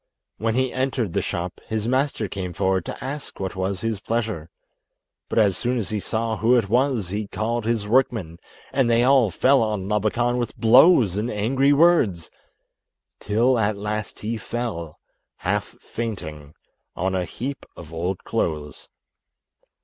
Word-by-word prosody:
When 115 +1 0
he 130 -1 +1
entered 130 -7 -1
the - - +1
shop, 85 +1 -4
his 110 0 -2
master 130 -3 0
came 90 -2 -5
forward 95 -1 0
to - - -6
ask 140 +2 -6
what 95 -1 -3
was 95 +1 -2
his 115 -3 -2
pleasure, 110 -7 -2 0.8
but - - -3
as 100 -4 +4
soon 125 +1 -1
as 105 -6 -2
he 105 - -1
saw 110 +2 -2
who 115 +5 +4
it 105 -5 0
was 125 -5 +1
he 105 +2 -3
called 115 +2 -2
his 110 -3 0
workmen, 110 -8 +1 0.3
and 130 -4 +2
they 115 0 +4
all 130 -4 +5
fell 130 +9 +3
on 105 -4 -1
Labakan 115 +4 +1
with 120 -2 -3
blows 115 - +6
and 110 +3 -1
angry 130 +7 +2
words, 145 - +3 0.9
till 115 +4 +2
at 105 -1 +1
last 105 0 -4
he 115 +2 -2
fell, 105 -9 -4 0.4
half - - -2
fainting, 80 -10 -6 0.4
on 95 +2 -1
a 95 -1 0
heap 135 +9 -5
of 80 -1 -11
old 90 +3 -3
clothes. 75 -1 -3
110 Hz, 155 wpm, -23 LUFS, 95-120 Hz, 0.9 s, blows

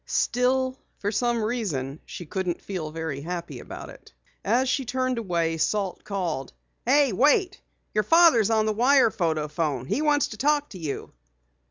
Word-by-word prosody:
Still, 260 +1 +1 0.2
for 205 - -2
some 235 +1 0
reason 165 - -2
she 175 - -7
couldn't 180 +1 -2
feel 180 -6 -4
very 160 -3 -4
happy 170 +2 -5
about - - -9
it. - - -16 0.3
As 255 +3 +2
she 270 +1 +1
turned 255 0 -1
away, 170 -6 -1
Salt 195 +2 -1
called: 170 -10 -3 0.3
"Hey, 280 0 +4
wait! 355 - +3 0.3
Your 215 - +2
father's 320 - +5
on 220 -1 +2
the 215 - +1
wire 250 +1 +4
photo 160 -5 -1
phone. 150 -5 -2
He 265 - -1
wants 295 -2 +2
to 215 - -8
talk 295 +3 +1
to 190 - -9
you." 150 -4 -5
215 Hz, 165 wpm, -25 LUFS, 165-255 Hz, 0.3 s, father's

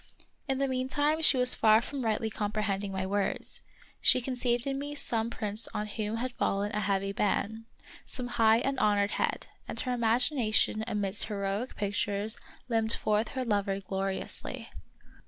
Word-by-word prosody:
In 270 -1 0
the 275 0 +1
mean 255 0 -1
time 295 +3 +1
she 290 -4 +7
was 250 0 +5
far 220 0 +5
from 265 +3 -5
rightly 220 0 0
comprehending 205 -2 -2
my 190 -1 -2
words; 200 +1 -1 0.4
she - - +6
conceived 245 -1 -1
in 275 0 -2
me 290 +1 -5
some 230 -5 0
prince 215 -1 +1
on 210 - -1
whom 215 +1 -3
had 255 +2 -2
fallen 205 -3 -1
a 210 - -1
heavy 195 -1 0
ban, 215 +2 -1 0.4
some 250 - -3
high 225 -2 +4
and 270 -1 -1
honored 205 -2 +2
head, - - -1 0.2
and - - -3
her 250 - -2
imagina 235 +1 +1
tion 215 0 +3
amidst 205 -2 0
heroic 200 +3 -3
pictures 205 +1 +1 0.3
limned 225 -2 +2
forth 215 +1 0
her 260 - -1
lover 200 -3 0
gloriously. 195 0 -4
220 Hz, 165 wpm, -29 LUFS, 205-250 Hz, 0.4 s, she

